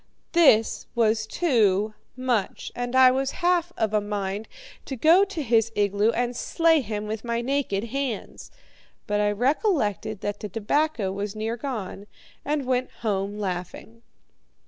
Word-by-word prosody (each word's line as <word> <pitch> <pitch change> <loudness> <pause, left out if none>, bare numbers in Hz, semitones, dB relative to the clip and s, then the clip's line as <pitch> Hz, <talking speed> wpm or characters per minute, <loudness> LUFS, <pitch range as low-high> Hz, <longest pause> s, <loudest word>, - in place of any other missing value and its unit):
This 280 -10 +4
was 220 -1 +2
too 215 - +2 0.2
much, 250 -5 -1
and 245 +1 -3
I 260 -1 +7
was 270 +1 -1
half 350 -1 +2
of 215 -1 0
a 210 - +3
mind 205 0 -3 0.4
to 270 - -5
go 325 - +5
to 375 -6 -5
his 230 -2 +2
igloo 205 +1 +2
and 240 +1 -1
slay 325 +4 +2
him 210 -3 -4
with 215 0 -4
my 235 -1 -1
naked 250 -6 -1
hands; 245 -2 -4 0.6
but 210 0 0
I 205 0 +2
recollected 220 - 0
that 205 -1 -3
the 210 - -6
tobacco 225 - 0
was 200 +1 -4
near 220 +2 -2
gone, 220 -6 -5 0.4
and 290 -1 -1
went 255 0 0
home 200 -1 -1
laughing. 195 +4 -5
225 Hz, 145 wpm, -25 LUFS, 205-265 Hz, 0.6 s, I